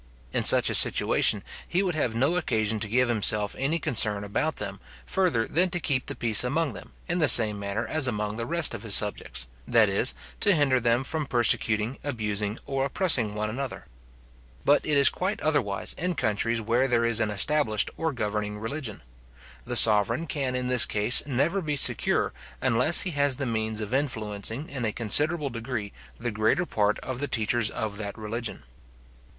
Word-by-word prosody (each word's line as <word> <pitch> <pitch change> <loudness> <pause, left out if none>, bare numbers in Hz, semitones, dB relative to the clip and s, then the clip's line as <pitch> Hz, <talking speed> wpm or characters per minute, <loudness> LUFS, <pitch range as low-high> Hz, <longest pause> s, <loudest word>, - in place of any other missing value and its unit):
In - - +1
such - - +5
a - - -2
situation, - - +2 0.2
he 185 +3 0
would 180 -2 -1
have 130 -7 -2
no 140 +9 +1
occasion 110 -10 -1
to 110 - -4
give 125 +4 +1
himself 105 -2 0
any 140 +5 0
concern 110 -10 +1
about 145 +10 -2
them, 100 -1 -7 0.3
further 180 -12 0
than 180 +3 +1
to 175 0 -2
keep 135 -6 -2
the - - -3
peace 115 -1 +2
among 145 +2 -1
them, - - -12
in 175 +1 -1
the 155 - +3
same 105 -5 +6
manner 100 +3 -3
as 155 -4 -1
among 105 -3 -3
the 115 +1 -4
rest 170 -3 -1
of 115 - -7
his 110 -3 +4
subjects, 105 -10 0 0.2
that 115 -3 +4
is, 100 +6 +1 0.2
to 205 -3 +3
hinder 140 -4 +2
them 120 +2 +1
from 150 +2 -1
persecuting, 115 -1 +1
abusing, 105 -5 -3
or 135 -1 -2
oppressing 135 - +2
one 105 0 -2
another. 130 +4 -6 0.8
But 145 - +3
it 150 -2 +1
is 140 -1 +6
quite 190 +7 -1
otherwise 140 -10 0
in 180 +1 -3
countries 115 +1 -1
where 120 +4 +1
there 120 -2 +1
is 115 -2 0
an 110 -2 0
established 110 +1 +1
or 160 -1 -2
governing 105 -4 -4
religion. 115 - -6 0.6
The - - -3
sovereign 115 +7 +6
can 135 -5 -3
in 125 0 -2
this 125 -1 +2
case 105 +4 +4
never 145 +9 0
be 150 -3 -2
secure, 140 - +1 0.3
unless 130 +6 +4
he 185 - 0
has 145 -3 +1
the 140 +1 -4
means 110 -2 -2
of 105 +3 -6
influencing 115 -1 -3
in 135 -3 -6
a 110 - 0
considerable 145 +7 +2
degree 115 -3 -5 0.3
the 120 0 -3
greater 110 +11 0
part 105 -7 0
of 130 -1 -6
the 145 - -2
teachers 115 -2 0
of 105 -2 -5
that 100 -2 -6
religion. 110 +1 -6
120 Hz, 185 wpm, -26 LUFS, 105-145 Hz, 0.8 s, same